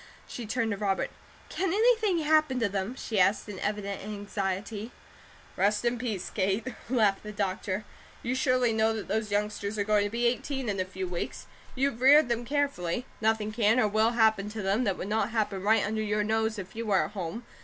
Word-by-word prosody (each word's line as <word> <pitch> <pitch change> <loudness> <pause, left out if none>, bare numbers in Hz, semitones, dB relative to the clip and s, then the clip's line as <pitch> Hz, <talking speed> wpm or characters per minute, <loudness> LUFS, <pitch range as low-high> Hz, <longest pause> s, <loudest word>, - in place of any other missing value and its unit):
She 235 -3 -7
turned 225 0 0
to 200 - -2
Robert. 195 -2 -1 0.4
"Can 380 -1 -1
anything 435 -2 +3
happen 305 -4 +3
to 225 - +2
them?" 200 +4 -3
she 220 -5 -2
asked, 195 +4 +3
in 200 -3 -7
evident 205 -1 -3
anxiety. 205 +1 -4 0.7
"Rest 210 +3 +1
in 240 0 +1
peace, 220 -7 -3
Kate," 195 +2 0 0.2
laughed 215 -6 +2
the 210 - -7
doctor. 195 0 -2 0.4
"You 245 - -1
surely 255 -2 +2
know 220 0 +2
that 215 - -5
those 215 +1 -1
youngsters 210 0 -1
are 205 - +1
going 210 0 +2
to - - -2
be 235 +3 -1
eighteen 250 +1 -1
in 200 -2 -2
a 185 - 0
few 185 0 -5
weeks. 175 -1 -4 0.3
You've 265 -2 0
reared 280 +1 +7
them 235 0 -1
carefully. 255 - -1 0.2
Nothing 220 -1 +1
can, 220 +2 +3
or 215 - +4
will, 220 +3 +2
happen 220 -3 +3
to 210 -1 -5
them, 200 +6 +1
that 195 -3 0
would - - -5
not 215 0 0
happen 215 -4 -1
right 215 +1 +3
under 215 +1 -1
your 210 0 0
nose 220 +1 0
if 190 0 -8
you 230 0 -4
were 195 -2 +3
at - - -8
home. 205 +5 -5
215 Hz, 205 wpm, -28 LUFS, 200-235 Hz, 0.7 s, reared